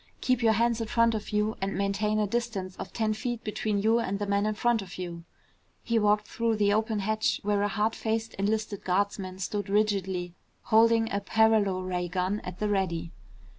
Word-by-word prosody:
Keep 255 -1 +1
your 225 -1 +4
hands 230 +1 +1
in 225 - -3
front 230 +1 +3
of 215 -1 -4
you 210 +1 0
and 195 +1 -2
maintain 200 +2 0
a 215 - +2
distance 205 -4 -3
of 190 - -7
ten 220 -1 0
feet 230 +1 -4
between 210 0 -1
you 220 +3 +3
and 200 -4 -1
the 205 - -2
man 200 +1 +1
in 215 - -1
front 235 +1 +2
of 195 0 -9
you." 170 -2 -6 0.6
He 230 -1 +1
walked 210 0 +2
through 230 -1 0
the 205 -1 +2
open 220 -1 0
hatch 215 +2 0
where 205 0 +1
a 205 - +2
hard 215 +2 0
faced 225 0 -2
enlisted 215 0 -1
guardsman 190 0 -1
stood 200 +1 -3
rigidly, 190 -4 0 0.3
holding 225 0 +4
a 200 - +1
paralo 210 -4 +2
ray 180 -1 -2
gun 185 +3 -1
at 180 -3 -8
the 210 - -1
ready. 185 -5 -1
210 Hz, 200 wpm, -28 LUFS, 195-220 Hz, 0.6 s, your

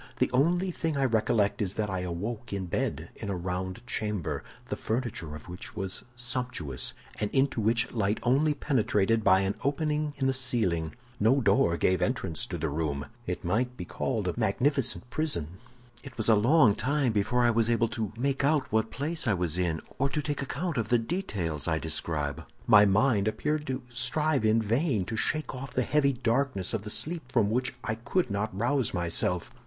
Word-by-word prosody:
The - - +1
only 175 +8 +2
thing 165 -3 -2
I 135 - +2
recollect 110 -4 +1
is 100 -2 -1
that 105 - -1
I 95 - -1
awoke 100 +7 -4
in 100 -2 -2
bed 85 - -2
in 100 - -6
a 100 - -1
round 90 +3 -4
chamber, 105 -7 -2 0.3
the - - -1
furniture 110 -10 -3
of 75 - -11
which 90 +6 -8
was 95 -2 -3
sumptuous, 125 - -3 0.2
and 105 - 0
into 135 -2 +1
which 115 +3 +2
light 110 -2 0
only 145 +5 +3
penetrated 115 -6 +1
by 95 0 +5
an 95 +1 0
opening 150 +1 0
in 135 - -1
the 135 - +3
ceiling. 110 -12 +1 0.2
No 115 +7 +4
door 100 -7 +3
gave 95 +1 +2
entrance 80 -2 -1
to 85 - -4
the 80 0 -1
room. 75 -1 -2 0.2
It 90 - -3
might 125 +7 0
be 90 - -5
called - - -2
a - - 0
magnificent 125 +4 +1
prison. 95 - -2 0.4
"It 135 -3 -11
was 110 - 0
a - - +8
long 120 +2 +5
time 140 +2 +1
before 110 +4 +1
I 120 - +5
was 115 0 +2
able 115 0 +3
to 110 -3 -3
make 135 +2 0
out 140 -1 +2
what 110 0 +1
place 155 +2 -2
I 110 - +3
was 85 -3 -1
in, 85 -3 0 0.2
or 140 +1 +2
to 150 - -1
take 145 -1 -2
account 145 +3 -3
of 110 -2 -1
the 120 - +5
details 100 - -2
I 80 -2 +2
describe. 80 -2 -1 0.2
My 105 -2 +7
mind 105 +1 +3
appeared 150 +8 -1
to 130 -1 -3
strive 130 +2 +1
in 110 +1 +3
vain 115 - +1
to 110 - -4
shake 155 +7 0
off 130 +1 -7
the 130 - +2
heavy 140 +1 +2
darkness 125 -5 0
of 110 - -1
the 105 - -7
sleep 155 +2 -1
from 110 -5 +2
which 125 +2 0
I 110 - -1
could 120 - -1
not 100 0 -2
rouse 125 0 +1
myself. 85 0 0
115 Hz, 195 wpm, -28 LUFS, 95-135 Hz, 0.4 s, a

